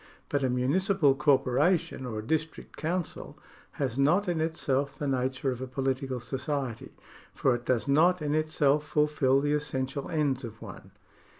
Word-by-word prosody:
But 145 -1 0
a 130 - +2
municipal 145 +5 +2
corporation 140 +1 +2
or 110 -3 -5
a 110 - -4
district 160 +4 -3
council 170 +1 -4 0.4
has 135 -2 -2
not 175 +9 +3
in 170 -3 0
itself 140 -4 -1
the 145 - -3
nature 130 0 -1
of 125 0 -6
a 130 - -4
political 130 0 -2
society, 130 0 -4 0.4
for 130 - +2
it 120 0 -4
docs 125 +1 +1
not 170 +6 +4
in 150 -1 -1
itself 150 -2 +2
fulfil 150 -3 +2
the 145 +1 +1
essential 135 -2 -2
ends 145 -4 0
of 110 -2 -8
one. 95 -3 -10
140 Hz, 160 wpm, -28 LUFS, 130-150 Hz, 0.4 s, not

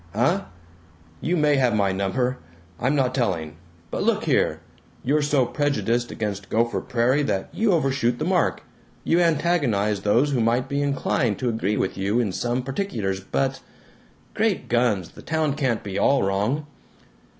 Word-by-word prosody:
"Huh! 165 - +2 0.8
You 175 +3 0
may 150 -2 +3
have 125 -4 +2
my 100 -2 +2
number. 125 +7 -1 0.4
I'm 130 +4 +1
not 130 -3 +1
telling. 85 - -1 0.3
But - - -2
look - - +1
here: - - +1 0.4
You're 150 +4 +2
so 145 -3 +2
prejudiced 120 -4 0
against 100 -3 -4
Gopher 115 +1 +1
Prairie 125 +3 +1
that 100 -9 -1
you 220 -1 +2
overshoot 135 -7 +1
the 155 - -2
mark; 180 -1 +1 0.4
you 170 - +2
antagonize 140 - +1
those 120 +8 +2
who 125 -4 +1
might 115 +3 +1
be 140 0 -1
inclined 135 -5 0
to 125 - -1
agree 105 -2 -1
with 95 - -2
you 100 +5 +1
in 110 -5 0
some 120 +6 -1
particulars 120 - -2
but 70 -8 -1 0.7
Great 215 -3 0
guns, 115 -7 +1
the - - -14
town 160 -2 0
can't 130 -6 -1
be 100 -2 -3
all 140 -4 +3
wrong!" 105 +10 0
125 Hz, 160 wpm, -24 LUFS, 105-145 Hz, 0.8 s, may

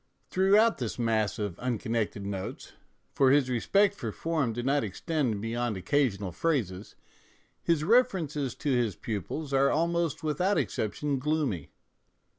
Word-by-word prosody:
Throughout 205 +3 +4
this 120 -4 -3
mass 110 -3 0
of 105 -6 -4
unconnected 115 -4 -2
notes 100 -2 -5 0.4
for 135 -2 +4
his 135 -2 +3
respect 195 - +3
for 115 - -5
form 155 -2 -1
did 120 +2 -4
not 140 0 +2
extend 110 - -2
beyond 115 -1 -2
occasional 100 -2 0
phrases 105 - -2 0.7
his 165 -3 +1
references 165 - +2
to 145 - -2
his 120 -6 +1
pupils 115 - -4
are 135 0 +4
almost 170 0 0
without 180 +6 +1
exception 140 +6 -1
gloomy. 140 - -1
130 Hz, 130 wpm, -29 LUFS, 110-155 Hz, 0.7 s, Throughout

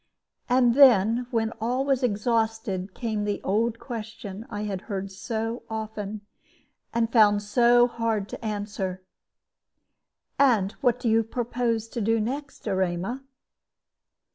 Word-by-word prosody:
And 245 -1 +4
then, 240 -3 +5
when 225 -3 0
all 250 +4 0
was 270 -2 +1
exhausted, 220 -4 -1
came 220 -3 -2
the 205 -1 -1
old 225 +4 +1
question 225 -3 -7
I 210 -2 -4
had 195 -3 -3
heard 195 -1 -3
so 225 +4 -3
often, 215 -1 -5 0.7
and 230 -1 0
found 205 -3 +5
so 240 +3 +5
hard 230 -4 -1
to - - -8
answer 205 -3 -4 1.4
"And 225 -8 +4
what 245 -2 +2
do 245 - -2
you 225 0 +4
propose 230 0 -2
to 235 - -4
do 225 +2 +2
next, 275 +6 -4
Erema?" 190 +6 -1
225 Hz, 125 wpm, -26 LUFS, 205-240 Hz, 1.4 s, then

